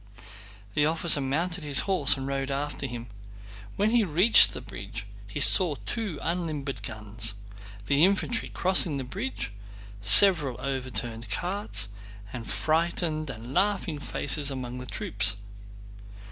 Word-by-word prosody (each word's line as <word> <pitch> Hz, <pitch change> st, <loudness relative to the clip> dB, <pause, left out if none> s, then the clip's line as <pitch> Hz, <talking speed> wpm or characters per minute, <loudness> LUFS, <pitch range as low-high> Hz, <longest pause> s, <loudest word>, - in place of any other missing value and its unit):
The 150 Hz, +4 st, +1 dB
officer 160 Hz, -2 st, +1 dB
mounted 165 Hz, +6 st, -3 dB
his 145 Hz, -3 st, +1 dB
horse 145 Hz, -8 st, +3 dB
and 135 Hz, -, -7 dB
rode 135 Hz, 0 st, -4 dB
after 140 Hz, 0 st, -5 dB
him. 120 Hz, -2 st, -8 dB, 0.7 s
When 210 Hz, +2 st, -1 dB
he 240 Hz, -1 st, +2 dB
reached 185 Hz, +5 st, +6 dB
the -, -, -7 dB
bridge 100 Hz, -1 st, -9 dB, 0.2 s
he 100 Hz, -, -7 dB
saw 170 Hz, +1 st, +4 dB
two 215 Hz, -9 st, -4 dB
unlimbered 155 Hz, -, -5 dB
guns, 110 Hz, 0 st, -2 dB, 0.5 s
the 140 Hz, +6 st, +1 dB
infantry 200 Hz, +5 st, 0 dB
crossing 180 Hz, -5 st, +1 dB
the 135 Hz, -, -5 dB
bridge, 195 Hz, -, -6 dB, 0.5 s
several 145 Hz, -, +8 dB
overturned 125 Hz, -4 st, -5 dB
carts, 180 Hz, -, -3 dB, 0.5 s
and 115 Hz, -3 st, -8 dB
frightened 160 Hz, -1 st, -2 dB
and 120 Hz, 0 st, -9 dB
laughing 190 Hz, -5 st, -1 dB
faces 145 Hz, 0 st, -1 dB
among 125 Hz, -2 st, -7 dB
the 125 Hz, -, -10 dB
troops. 105 Hz, -2 st, 0 dB
145 Hz, 130 wpm, -25 LUFS, 120-175 Hz, 0.7 s, several